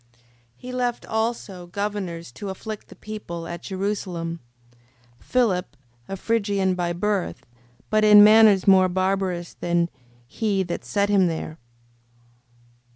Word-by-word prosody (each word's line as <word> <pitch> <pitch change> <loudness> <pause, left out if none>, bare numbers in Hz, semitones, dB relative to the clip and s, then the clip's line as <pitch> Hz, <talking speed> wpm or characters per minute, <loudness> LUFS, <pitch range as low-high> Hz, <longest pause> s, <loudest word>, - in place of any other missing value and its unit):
5:22. - - -31 0.4
He 250 - -9
left 245 -1 -2
also 220 -5 -3
governors 185 - -4
to 195 +11 -7
afflict 215 +2 -7
the - - -14
people: 190 -6 -7
at 170 0 -6
Jerusalem, 185 -4 -3 0.8
Philip, 215 -8 0 0.3
a 195 - -4
Phrygian 200 -3 0
by 175 -1 -1
birth, 195 +1 -2 0.5
but 215 0 +3
in 210 -1 +9
manners 215 -3 +6
more 190 -1 +6
barbarous 185 -1 -1
than 170 0 0 0.3
he 195 - -1
that 175 -1 -5
set 200 0 0
him 195 -3 +4
there: 160 -1 -3
5:23. 155 - -15
195 Hz, 130 wpm, -24 LUFS, 175-210 Hz, 0.8 s, in